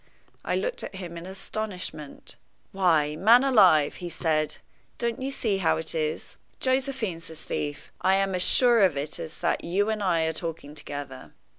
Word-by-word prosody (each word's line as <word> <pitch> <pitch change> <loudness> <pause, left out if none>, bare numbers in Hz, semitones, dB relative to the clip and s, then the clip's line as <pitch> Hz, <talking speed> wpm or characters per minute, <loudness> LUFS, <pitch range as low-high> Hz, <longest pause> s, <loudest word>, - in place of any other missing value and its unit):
I - - -1
looked - - -2
at - - -7
him 175 -3 -7
in 170 +1 -8
astonishment. 190 -5 -6 0.4
"Why, 160 -6 +2
man 230 +9 +6
alive," 185 - +5
he 175 -2 -6
said, 155 -3 -1 0.4
"don't 235 +1 -2
you 265 - -2
see 220 -7 -1
how 170 - +2
it 160 - -3
is? 155 -1 -3 0.2
Josephine's 260 -10 0
the 160 - -10
thief! 145 -1 -5
I 190 +1 +3
am 195 0 +1
as 180 - 0
sure 240 +4 +5
of 180 -7 +3
it 145 +2 -4
as 160 - -7
that 170 - 0
you 200 +5 0
and 215 -1 -3
I 175 -4 +2
are 160 0 0
talking 160 -3 -6
together. 145 -3 -8
180 Hz, 175 wpm, -26 LUFS, 155-215 Hz, 0.4 s, man